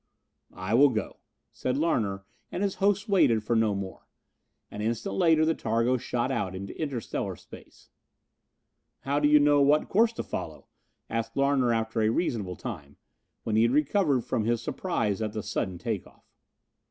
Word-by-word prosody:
"I 95 +3 -3
will 140 +4 +7
go," 110 -4 -3 0.3
said 130 +1 -2
Larner, 105 -12 0 0.3
and 185 - -2
his 200 -1 0
hosts 200 +1 +2
waited 120 - +3
for 115 +2 0
no 110 -2 +2
more. 95 -1 -7 0.6
An 105 - -6
instant 110 -2 -2
later 160 - +4
the 160 - +2
targo 115 0 0
shot 120 +1 -2
out 95 -7 -2
into 95 +1 -7
interstellar 135 -7 -3
space. - - -16 1.1
"How 140 +1 0
do 145 - +3
you 150 0 +6
know 145 0 +4
what 145 +2 +3
course 225 +3 +4
to - - -4
follow?" - - -6 0.4
asked 115 +1 -3
Larner 140 -3 +2
after 110 0 0
a 110 - +3
reasonable 110 - -1
time, 70 -4 -8 0.5
when 110 - -1
he 110 - +4
had 115 +2 +3
recovered 150 -2 +2
from 115 -2 -2
his 120 0 +1
surprise 115 - -2
at 105 -1 -2
the 110 -2 -4
sudden 95 -2 -3
take 105 -1 -3
off. - - -23
120 Hz, 170 wpm, -27 LUFS, 110-145 Hz, 1.1 s, will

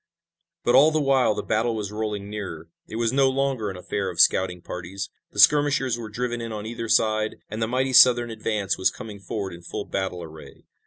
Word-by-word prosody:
But 120 - +2
all 140 +4 +7
the 155 0 0
while 135 -6 +2
the 105 - -4
battle 115 +1 0
was 105 -2 -4
rolling 105 -2 -4
nearer. 100 -6 -7 0.2
It 110 - -8
was 115 +1 0
no 135 0 +4
longer 130 -5 -1
an 95 - -7
affair 95 +1 -3
of 85 -2 -8
scouting 90 -1 +3
parties. 90 +2 -7 0.2
The - - -16
skirmishers 145 -4 +4
were 115 -2 -7
driven 120 +2 -3
in 115 0 -5
on 105 -1 -5
either 115 0 -5
side 110 -1 +2 0.2
and 110 +1 -4
the 110 - +1
mighty 130 +2 -1
Southern 120 -2 +6
advance 105 -3 -2
was 95 - +3
coming 110 -4 -9
forward 100 0 -5
in 85 - -11
full 100 +4 -6
battle 95 -2 -3
array. 80 -1 -13
110 Hz, 210 wpm, -24 LUFS, 100-120 Hz, 0.2 s, all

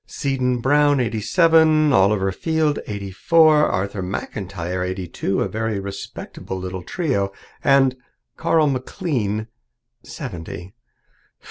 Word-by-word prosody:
'Seddon 130 -3 -1
Brown, 145 +2 +3
eighty 115 -3 -1
seven; 160 - +4
Oliver 95 -1 +3
Field, 160 - 0
eighty 100 -2 -5
four; 155 - +4
Arthur 100 +1 -2
McIntyre, 90 -1 -4
eighty 95 0 -4
two' 95 +4 -2
a - - +1
very 110 -2 -2
respectable 100 -1 -7
little 95 0 -5
trio. 100 - -1 0.3
And 135 -2 +4 0.4
'Carl 160 -1 +2
McLean, 130 - -2 0.6
seventy.' 85 +2 -8
110 Hz, 110 wpm, -21 LUFS, 95-150 Hz, 0.6 s, seven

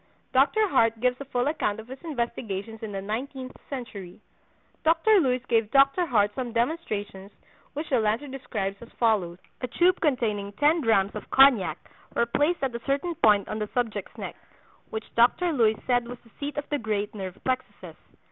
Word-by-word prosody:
Dr. 315 +12 +4
Hart 230 - +2
gives 250 +2 +1
a - - -5
full 245 -2 -1
account 255 -9 -1
of 220 - -10
his 260 +1 -9
investigations 230 - -4
in 220 -2 -5
the 195 -1 -4
Nineteenth 255 +5 -5
Century. 205 -9 -7 0.6
Dr. 335 +6 +4
Luys 255 -5 +1
gave 225 -2 +2
Dr. 275 +7 +4
Hart 210 -6 +3
some 245 -1 -4
demonstrations, 215 - -2 0.4
which 300 +2 -4
the 255 - +4
latter 220 +5 0
describes 250 -7 -4
as 235 - -11
follows: 205 -7 +2 0.2
"A 250 - -2
tube 355 +7 +2
containing 220 -9 0
ten 300 +8 +3
drachms 210 -5 +2
of - - -8
cognac 225 - +5 0.4
were 235 - +3
placed 290 +7 0
at 265 -2 0
a 235 - -4
certain 285 +6 0
point 210 -9 +3
on 215 - -4
the 210 -1 -3
subject's 225 -5 -2
neck, - - -6 0.5
which 220 0 -5
Dr. 320 +9 +3
Luys 220 -5 +3
said 245 -2 +1
was 245 +1 -7
the 230 - -21
seat 290 +1 -4
of 290 - -3
the 290 - 0
great 210 -2 -2
nerve 190 -3 -6
plexuses. 255 0 -3
240 Hz, 180 wpm, -26 LUFS, 215-275 Hz, 0.6 s, cognac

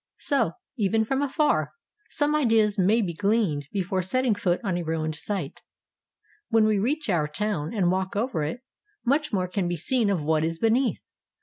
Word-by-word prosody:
So, 280 -1 +1 0.2
even 220 +1 +1
from 270 +4 0
afar, 290 +2 +1 0.4
some 295 0 +1
ideas 225 -8 +3
may 210 +5 +3
be 175 -3 -3
gleaned 195 - 0
before 190 -1 -1
setting 250 +6 +1
foot 180 -3 0
on 190 -4 -1
a 175 - -1
ruined 160 -1 -2
site. 195 +6 -5 0.9
When 225 -2 +4
we 215 -2 +2
reach 280 +9 -1
our 170 -7 +1
town 160 -2 -2
and 190 -6 +1
walk 190 +1 -2
over 225 -5 -1
it, 155 +12 -3 0.4
much 285 +4 +1
more 185 -4 0
can 185 0 -1
be 175 - -1
seen 225 - +1
of 180 -6 0
what 155 0 +1
is 165 +1 -1
beneath. 235 +6 +1
205 Hz, 180 wpm, -26 LUFS, 175-235 Hz, 0.9 s, When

